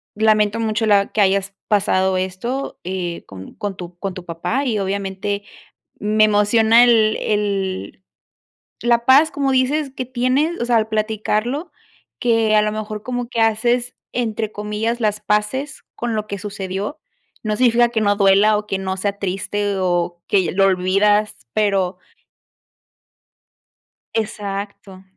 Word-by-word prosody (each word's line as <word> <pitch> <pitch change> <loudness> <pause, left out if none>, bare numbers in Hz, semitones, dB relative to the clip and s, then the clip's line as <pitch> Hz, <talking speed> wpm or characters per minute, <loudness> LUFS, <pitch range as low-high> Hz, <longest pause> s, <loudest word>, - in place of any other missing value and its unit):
lamento 215 0 +2
mucho 225 0 0
la 200 -1 +3
que 215 - +1
hayas 195 0 +2
pasado 190 -2 +2
esto, 190 +9 -3
eh, 180 -2 -4
con 95 -1 -11
con 205 -2 -4
tu 175 0 -9
con 195 -2 -3
tu 185 - -8
papá, 175 +12 -2
y 220 -5 0
obviamente 200 +1 -3 0.6
me 215 +1 +2
emociona 220 +3 +5
el 220 -3 +4
el 195 -3 -2 0.8
la 235 0 +2
paz, 280 +4 +6
como 280 -2 0
dices, 270 +2 +1
que 255 - -3
tienes, 260 +7 0
o - - 0
sea, 240 -1 +3
al 220 -1 +1
platicarlo, 220 - -1 0.5
que 225 -3 +2
a 210 - +5
lo 210 - 0
mejor 215 0 -5
como 245 0 -4
que 230 -2 -1
haces, 240 +3 +1 0.2
entre 220 -3 -2
comillas, 210 +3 -2
las 210 -2 0
paces 210 +7 -1
con 235 -1 -3
lo 215 -1 -2
que 200 -1 -5
sucedió, 195 +3 -5 0.4
no 215 -1 -1
significa 240 -1 +4
que 230 -2 -1
no 205 -1 +3
duela, 200 +1 +4
o, 210 - -4
que 195 - -1
no 190 0 -3
sea 200 +1 -2
triste, 200 +1 -2
o, 175 -1 -1
que 190 -4 +2
lo 195 +1 +4
olvidas, 195 +3 +2 0.2
pero 195 -3 +1 2.1
Exacto. 200 -3 -5
210 Hz, 145 wpm, -20 LUFS, 195-230 Hz, 2.1 s, paz